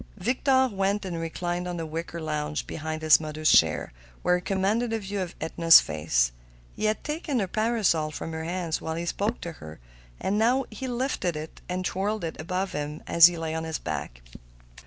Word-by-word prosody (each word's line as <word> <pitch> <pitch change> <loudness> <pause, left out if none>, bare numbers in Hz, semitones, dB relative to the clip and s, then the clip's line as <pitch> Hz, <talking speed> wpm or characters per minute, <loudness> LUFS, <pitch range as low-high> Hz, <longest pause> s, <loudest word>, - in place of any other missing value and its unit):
Victor 260 +5 +2
went 200 -2 -1
and 175 -3 -4
reclined 175 +2 -3
on 175 -1 -4
the 165 - -3
wicker 165 +2 -5
lounge 150 -1 -3
behind 155 0 -5
his 155 -1 +7
mother's 155 0 0
chair, 80 -6 +3 0.3
where 180 - +3
he - - -6
commanded 205 +6 0
a - - +1
view 200 -1 -4
of 180 -2 -5
Edna's 165 +1 +7
face. - - 0 0.4
He - - -2
had 215 0 0
taken 300 -2 -2
her 205 - +1
parasol 215 -7 +1
from 155 +2 -6
her 160 0 -4
hands 170 -1 -2
while 160 0 -3
he 170 +1 -3
spoke 205 +6 -1
to 170 - -5
her, 80 0 -10 0.4
and 190 - -1
he - - +2
now 250 +4 +3 0.2
lifted 250 - -1
it 155 +1 -7
and 185 +1 -2
twirled 205 +2 -1
it 160 -1 -4
above 185 +3 -2
him 150 +1 -5
as 170 0 +8
he 175 -1 -3
lay 160 -1 -3
on 160 0 -2
his 160 -2 -3
back. 70 -6 -5
175 Hz, 200 wpm, -26 LUFS, 155-205 Hz, 0.4 s, as